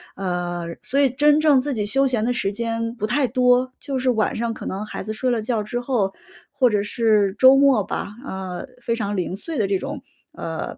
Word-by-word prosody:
呃， 175 Hz, -2 st, -3 dB, 0.2 s
所 265 Hz, -, -3 dB
以 275 Hz, -, +5 dB
真 290 Hz, +3 st, +4 dB
正 300 Hz, -4 st, +5 dB
自 285 Hz, +2 st, -2 dB
己 215 Hz, -4 st, -1 dB
休 270 Hz, +5 st, +3 dB
闲 240 Hz, -4 st, +1 dB
的 240 Hz, -, +1 dB
时 205 Hz, -5 st, -1 dB
间 230 Hz, +1 st, -2 dB
不 215 Hz, -3 st, -3 dB
太 260 Hz, +3 st, +1 dB
多。 250 Hz, +1 st, +2 dB
就 275 Hz, -2 st, -4 dB
是 255 Hz, -, +1 dB
晚 220 Hz, -2 st, 0 dB
上 230 Hz, 0 st, -2 dB
可 -, -, -9 dB
能 200 Hz, +3 st, -4 dB
孩 -, -, -6 dB
子 215 Hz, -, -5 dB
睡 255 Hz, +4 st, -1 dB
了 235 Hz, -3 st, 0 dB
觉 225 Hz, -1 st, -1 dB
之 240 Hz, +3 st, -4 dB
后， 235 Hz, -7 st, 0 dB, 0.4 s
或 255 Hz, -3 st, +3 dB
者 210 Hz, -2 st, +1 dB
是 210 Hz, -2 st, +1 dB
周 260 Hz, +3 st, +7 dB
末 270 Hz, -7 st, +4 dB
吧， 205 Hz, -, -5 dB
啊， 190 Hz, -7 st, -5 dB, 0.2 s
非 230 Hz, -1 st, -1 dB
常 205 Hz, -3 st, -3 dB
零 180 Hz, 0 st, -2 dB
碎 320 Hz, +9 st, -6 dB
的 210 Hz, -4 st, +1 dB
这 195 Hz, 0 st, +1 dB
种， 285 Hz, +8 st, -6 dB, 0.3 s
呃， -, -, -5 dB
230 Hz, 240 characters per minute, -22 LUFS, 205-260 Hz, 0.4 s, 周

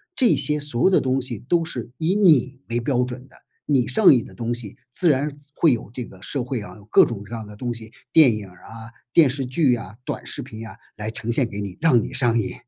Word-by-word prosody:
这 250 Hz, -8 st, +4 dB
些 150 Hz, 0 st, +1 dB
所 145 Hz, -5 st, 0 dB
有 -, -, +6 dB
的 -, -, +4 dB
东 130 Hz, 0 st, 0 dB
西 125 Hz, -4 st, -4 dB
都 165 Hz, -, 0 dB
是 120 Hz, -7 st, -5 dB
以 160 Hz, +3 st, 0 dB
你 145 Hz, -, +3 dB
为 120 Hz, +1 st, 0 dB
标 125 Hz, +1 st, 0 dB
准 125 Hz, +1 st, -7 dB
的。 -, -, -21 dB, 0.3 s
你 135 Hz, -5 st, +2 dB
上 215 Hz, -7 st, +6 dB
瘾 120 Hz, -4 st, +2 dB
的 -, -, -14 dB
东 120 Hz, 0 st, -3 dB
西 115 Hz, -4 st, -5 dB, 0.2 s
自 175 Hz, +6 st, +2 dB
然 145 Hz, +1 st, 0 dB, 0.2 s
会 160 Hz, -5 st, +4 dB
有 115 Hz, -, -5 dB
这 125 Hz, 0 st, -5 dB
个 95 Hz, -, -16 dB
社 135 Hz, +4 st, 0 dB
会 125 Hz, -1 st, -3 dB
啊， 105 Hz, -, -10 dB
有 105 Hz, -, -16 dB
各 -, -, +6 dB
种 105 Hz, -4 st, -6 dB
各 115 Hz, -, -10 dB
样 110 Hz, -2 st, -7 dB
的 105 Hz, -, -11 dB
东 120 Hz, +3 st, -4 dB
西， 110 Hz, -1 st, -6 dB, 0.2 s
电 140 Hz, -8 st, +6 dB
影 105 Hz, -2 st, -7 dB
儿 90 Hz, -2 st, -18 dB
啊、 115 Hz, 0 st, -11 dB, 0.2 s
电 160 Hz, +1 st, +6 dB
视 135 Hz, +1 st, -2 dB
剧 130 Hz, 0 st, +2 dB
啊、 115 Hz, -2 st, -6 dB
短 -, -, -4 dB
视 -, -, -3 dB
频 110 Hz, +1 st, -9 dB
啊， 95 Hz, -, -11 dB, 0.2 s
来 105 Hz, 0 st, -5 dB
呈 115 Hz, +1 st, -3 dB
现 120 Hz, 0 st, +1 dB
给 100 Hz, -, -6 dB
你， 100 Hz, -3 st, -5 dB
让 125 Hz, -9 st, +4 dB
你 -, -, -7 dB
上 120 Hz, -3 st, +2 dB
瘾。 105 Hz, -, -3 dB
125 Hz, 280 characters per minute, -22 LUFS, 110-140 Hz, 0.3 s, 有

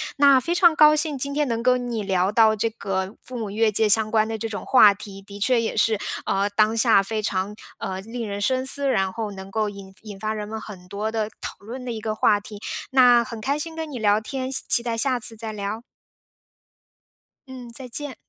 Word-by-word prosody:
那 280 Hz, -2 st, +6 dB
非 335 Hz, +7 st, -2 dB
常 345 Hz, -2 st, +5 dB
高 305 Hz, -1 st, +6 dB
兴 305 Hz, -1 st, 0 dB
今 280 Hz, +2 st, -3 dB
天 295 Hz, +1 st, +1 dB
能 230 Hz, -2 st, -2 dB
跟 250 Hz, 0 st, +1 dB
你 225 Hz, -2 st, -2 dB
聊 185 Hz, +2 st, +2 dB
到 220 Hz, 0 st, +4 dB
这 220 Hz, +2 st, 0 dB
个 195 Hz, -2 st, -4 dB
父 255 Hz, -, -10 dB
母 220 Hz, -3 st, -4 dB
越 220 Hz, +1 st, +2 dB
界 215 Hz, +1 st, +2 dB
相 215 Hz, +1 st, +3 dB
关 220 Hz, -1 st, +2 dB
的 225 Hz, 0 st, -3 dB
这 225 Hz, -, -4 dB
种 215 Hz, -, -5 dB
话 215 Hz, -6 st, +7 dB
题， 200 Hz, -1 st, -10 dB
的 200 Hz, +1 st, -11 dB
确 245 Hz, +4 st, +3 dB
也 225 Hz, -, -3 dB
是， 220 Hz, 0 st, +2 dB, 0.3 s
呃， 195 Hz, +1 st, +1 dB
当 215 Hz, +2 st, +2 dB
下 225 Hz, -3 st, +5 dB
非 215 Hz, +2 st, -3 dB
常， 195 Hz, +1 st, -2 dB, 0.2 s
呃， 190 Hz, 0 st, -4 dB
令 230 Hz, +2 st, -6 dB
人 200 Hz, 0 st, -4 dB
深 255 Hz, +5 st, +1 dB
思， 280 Hz, +1 st, +1 dB
然 195 Hz, -7 st, +1 dB
后 220 Hz, 0 st, -4 dB
能 190 Hz, -1 st, -9 dB
够 215 Hz, +1 st, 0 dB
引 200 Hz, -1 st, -11 dB
引 205 Hz, -3 st, -10 dB
发 215 Hz, +1 st, -2 dB
人 210 Hz, -1 st, -5 dB
们 220 Hz, +1 st, -5 dB
很 185 Hz, -5 st, -11 dB
多 205 Hz, +3 st, -3 dB
的 220 Hz, -1 st, -2 dB
讨 -, -, -6 dB
论 240 Hz, +5 st, -8 dB
的 250 Hz, -, -4 dB
一 225 Hz, -, -4 dB
个 215 Hz, 0 st, -3 dB
话 210 Hz, -1 st, +3 dB
题。 205 Hz, 0 st, -10 dB, 0.3 s
那 245 Hz, -2 st, +6 dB
很 230 Hz, -1 st, -8 dB
开 275 Hz, +6 st, 0 dB
心 320 Hz, +2 st, -5 dB
跟 320 Hz, -1 st, -5 dB
你 260 Hz, -, -5 dB
聊 210 Hz, -1 st, +3 dB
天， 260 Hz, +3 st, -4 dB
希 270 Hz, -, -1 dB
期 235 Hz, -, +2 dB
待 235 Hz, -1 st, -2 dB
下 255 Hz, +1 st, +1 dB
次 225 Hz, 0 st, +1 dB
再 220 Hz, 0 st, -5 dB
聊。 210 Hz, +1 st, -5 dB, 1.7 s
嗯， 255 Hz, -2 st, -9 dB
再 255 Hz, +2 st, -7 dB
见。 285 Hz, +2 st, -6 dB
220 Hz, 250 characters per minute, -23 LUFS, 205-255 Hz, 1.7 s, 话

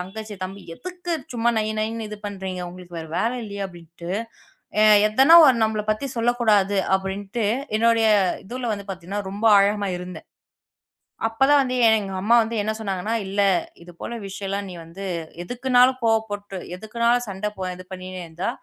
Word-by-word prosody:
தங்கச்சி, 210 Hz, +3 st, -7 dB
தம்பி 195 Hz, +2 st, -7 dB
"எதுக்கு 360 Hz, -, -6 dB, 0.2 s
சும்மா 235 Hz, 0 st, +1 dB
நை 215 Hz, -, +1 dB
நைன்னு 220 Hz, 0 st, -2 dB
இது 210 Hz, -, -7 dB
பண்றீங்க? 190 Hz, -2 st, -5 dB
உங்களுக்கு 175 Hz, -1 st, -11 dB
வேற 160 Hz, -1 st, -7 dB
வேலை 235 Hz, +3 st, 0 dB
இல்லையா?" 200 Hz, -1 st, -5 dB
அப்படின்னுட்டு. 170 Hz, 0 st, -11 dB, 0.7 s
அ, -, -, +6 dB, 0.3 s
எதனா 265 Hz, +9 st, +6 dB
ஒண்ணு 240 Hz, -4 st, +4 dB
நம்மள 215 Hz, -1 st, -1 dB
பத்தி 215 Hz, +6 st, -1 dB
சொல்லக் 240 Hz, +1 st, +1 dB
கூடாது 205 Hz, -3 st, +3 dB, 0.2 s
அப்படின்னுட்டு 195 Hz, +3 st, -4 dB, 0.3 s
என்னோடய 230 Hz, 0 st, +3 dB, 0.4 s
இதுல 240 Hz, +2 st, -4 dB
வந்து 200 Hz, -1 st, -6 dB
பார்த்தீங்கன்னா 190 Hz, +2 st, -4 dB
ரொம்ப 205 Hz, +3 st, -5 dB
ஆழமா 200 Hz, 0 st, +2 dB
இருந்தேன். 180 Hz, -2 st, -9 dB, 1.0 s
அப்பத் 270 Hz, +5 st, +2 dB
தான் 290 Hz, -, +6 dB
வந்து 255 Hz, -1 st, -1 dB
எ -, -, +7 dB
எங்க 195 Hz, -2 st, -6 dB
அம்மா 230 Hz, +4 st, +4 dB
வந்து 225 Hz, +1 st, -4 dB
என்ன 215 Hz, -, -1 dB
சொன்னாங்கன்னா, 200 Hz, +1 st, -2 dB
இல்ல. 200 Hz, +1 st, 0 dB, 0.4 s
இது 175 Hz, -, -12 dB
போல 235 Hz, -, -5 dB
விஷயம்லாம் 195 Hz, 0 st, -4 dB
நீ -, -, -8 dB
வந்து 190 Hz, +4 st, -9 dB, 0.4 s
எதுக்குன்னாலும் 250 Hz, +3 st, +3 dB
கோபப்பட்டு, 205 Hz, -3 st, -1 dB, 0.2 s
எதுக்குன்னாலும் 235 Hz, +3 st, 0 dB
சண்டை 200 Hz, +2 st, -3 dB
ப 185 Hz, -1 st, -3 dB
இது 185 Hz, -, -10 dB
பண்ணினே 185 Hz, 0 st, -7 dB
இருந்தா, 170 Hz, +4 st, -4 dB
205 Hz, 165 wpm, -23 LUFS, 190-230 Hz, 1.0 s, எ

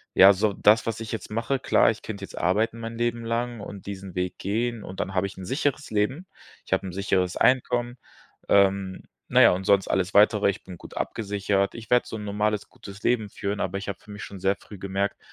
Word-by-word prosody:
ja, 100 Hz, +1 st, +9 dB
so, 100 Hz, +1 st, +1 dB
das, 110 Hz, +3 st, +4 dB
was 115 Hz, 0 st, -2 dB
ich 110 Hz, -, -6 dB
jetzt 110 Hz, -1 st, -5 dB
mache 115 Hz, +5 st, 0 dB
klar, -, -, +4 dB
ich 110 Hz, -, -8 dB
könnte 100 Hz, -3 st, -6 dB
jetzt -, -, -13 dB
arbeiten 110 Hz, +6 st, +1 dB
mein 115 Hz, 0 st, -6 dB
Leben 120 Hz, 0 st, -1 dB
lang 115 Hz, -1 st, -2 dB
und 100 Hz, -1 st, -9 dB
diesen 95 Hz, -2 st, -7 dB
Weg 90 Hz, 0 st, -2 dB
gehen 115 Hz, +3 st, -2 dB
und 95 Hz, +1 st, -8 dB
dann 95 Hz, -, -3 dB
habe 95 Hz, -, +2 dB
ich 95 Hz, -, -12 dB
'n 95 Hz, -, -7 dB
sicheres 145 Hz, -, -1 dB
Leben. 130 Hz, -, -1 dB, 0.4 s
Ich -, -, -2 dB
habe -, -, +1 dB
'n 90 Hz, -, -6 dB
sicheres 95 Hz, -2 st, 0 dB
Einkommen, 120 Hz, -1 st, +2 dB, 0.5 s
ähm, 100 Hz, -1 st, +3 dB, 0.3 s
na -, -, +6 dB
ja, -, -, +8 dB
und 95 Hz, -, -3 dB
sonst 100 Hz, -1 st, +4 dB
alles 95 Hz, 0 st, 0 dB
Weitere, 105 Hz, -1 st, +5 dB
ich 100 Hz, -, -4 dB
bin 90 Hz, -2 st, -10 dB
gut -, -, -11 dB
abgesichert. 100 Hz, -2 st, -1 dB
Ich 110 Hz, -1 st, -9 dB
werde 125 Hz, 0 st, +4 dB
so -, -, -6 dB
'n 105 Hz, -, -7 dB
normales 105 Hz, 0 st, -1 dB
gutes 100 Hz, +1 st, -12 dB
Leben 110 Hz, -4 st, +1 dB
führen, 100 Hz, +1 st, -4 dB
aber 95 Hz, +1 st, -2 dB
ich 100 Hz, -, -6 dB
habe 100 Hz, -, -5 dB
für 105 Hz, -, -21 dB
mich 105 Hz, -, -8 dB
schon 100 Hz, -2 st, -8 dB
sehr 95 Hz, +2 st, +2 dB
früh 105 Hz, -, -12 dB
gemerkt, 100 Hz, +1 st, -2 dB
100 Hz, 230 wpm, -25 LUFS, 95-115 Hz, 0.5 s, ja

